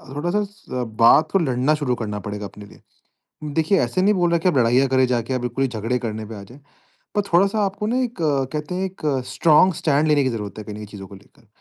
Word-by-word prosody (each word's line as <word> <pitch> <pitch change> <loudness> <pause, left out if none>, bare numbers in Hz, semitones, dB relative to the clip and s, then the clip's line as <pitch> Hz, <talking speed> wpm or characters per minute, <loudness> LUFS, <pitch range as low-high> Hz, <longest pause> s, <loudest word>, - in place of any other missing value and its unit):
थोड़ा-सा 175 -4 -3 0.2
बात 155 +6 +6
को 195 - +3
लड़ना 135 -2 +1
शुरू 140 -5 -1
करना 105 -3 -4
पड़ेगा 105 0 -5
अपने 105 +1 -11
लिए। - - -17 0.8
देखिए 165 +4 +2
ऐसे 125 +9 0
नहीं 205 +2 +4
बोल 175 -3 +1
रहा 170 - +3
कि 165 - +1
आप 175 - +1
लड़ाइयाँ 125 +3 +3
करे 130 0 +3
जाके 125 0 -1
आप 130 - -1
बिल्कुल 125 +2 -3
ही - - +1
झगड़े 115 +1 -2
करने 110 -2 -5
पे 110 - -8
आ 100 - -8
जाए। 125 +8 -14 0.6
पर 205 - +3
थोड़ा-सा 195 +5 +3
आपको 200 +2 -3
ना 240 +3 0
एक 245 -2 -3
कहते 150 +2 -1
हैं 190 +1 -1
एक 190 0 -9 0.3
स्ट्रांग 155 +7 +4
स्टैंड 155 -3 +1
लेने 150 -2 +3
की 130 - +1
ज़रूरत 105 -5 -5
है 110 - -6
कहीं 105 - -8
न - - -8
कहीं 105 - -7
चीज़ों 100 -2 -10
को 100 - -12
लेकर। 100 +3 -21
135 Hz, 245 wpm, -22 LUFS, 115-175 Hz, 0.8 s, बात